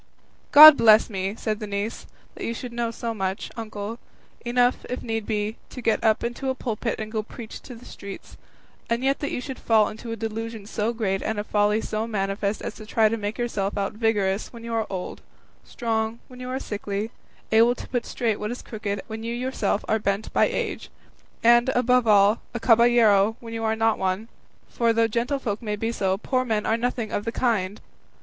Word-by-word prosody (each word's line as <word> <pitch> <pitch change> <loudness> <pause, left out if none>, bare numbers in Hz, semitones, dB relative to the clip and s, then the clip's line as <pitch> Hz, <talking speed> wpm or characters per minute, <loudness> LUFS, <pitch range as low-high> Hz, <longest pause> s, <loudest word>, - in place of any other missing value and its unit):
"God 305 0 +12
bless 220 0 +6
me!" 195 +1 -2
said 215 -2 -3
the 215 - -5
niece, 200 +2 -4 0.3
"that - - -8
you 230 - -2
should 245 0 -7
know 235 -1 -1
so 230 0 -4
much, 190 -2 -3
uncle 220 0 -6 0.4
enough, 245 +1 +2
if 250 - -4
need 225 -2 -3
be, 215 0 -2
to - - -9
get 225 -2 0
up 220 -1 +3
into 240 +3 -3
a 260 - 0
pulpit 230 -2 -3
and 215 0 -5
go 220 -1 -1
preach 220 +1 -10
in 245 - -8
the 240 - -15
streets 200 -1 -10 0.5
and 235 +2 0
yet 275 +1 +1
that 290 - -2
you - - -3
should 265 +1 -7
fall 220 -2 +3
into 220 +2 -8
a - - -2
delusion 225 -1 -5
so 215 +2 -1
great 200 -5 -1
and 220 - -2
a 205 - -1
folly 210 +1 +1
so 220 +1 -3
manifest 200 -1 -2
as - - -4
to 215 - -11
try 220 0 +3
to 230 - -1
make 210 -1 -4
yourself 210 -5 -2
out 200 0 -1
vigorous 210 -3 0
when 235 -1 -11
you 230 0 -5
are 225 -1 0
old, 185 -2 -5 0.4
strong 225 -1 -2
when 250 -1 -12
you 250 0 -6
are 260 - -2
sickly, 205 -1 -4 0.4
able 230 +2 +5
to - - -9
put 245 -2 -1
straight 225 -4 -1
what 210 - -3
is 245 - -6
crooked 205 -3 -4
when 220 0 -7
you 230 +1 -3
yourself 245 -5 -1
are 220 - +2
bent 200 +1 -2
by - - +4
age, - - -3 0.5
and, 240 +2 +6
above 250 -1 +3
all, 205 +1 +5
a - - -1
caballero 225 -3 +4
when 230 -1 -9
you 225 0 -3
are 220 0 +1
not 225 0 +1
one; 190 +4 -1 0.4
for 230 -1 +1
though 230 0 +3
gentlefolk 235 -1 -2
may 210 -2 -2
be 225 +2 -2
so, 190 -4 0
poor 255 +4 0
men 220 -4 -1
are 220 - +2
nothing 235 -1 -2
of 205 - -2
the 230 - -2
kind!" 215 -6 -1
225 Hz, 210 wpm, -24 LUFS, 210-235 Hz, 0.5 s, God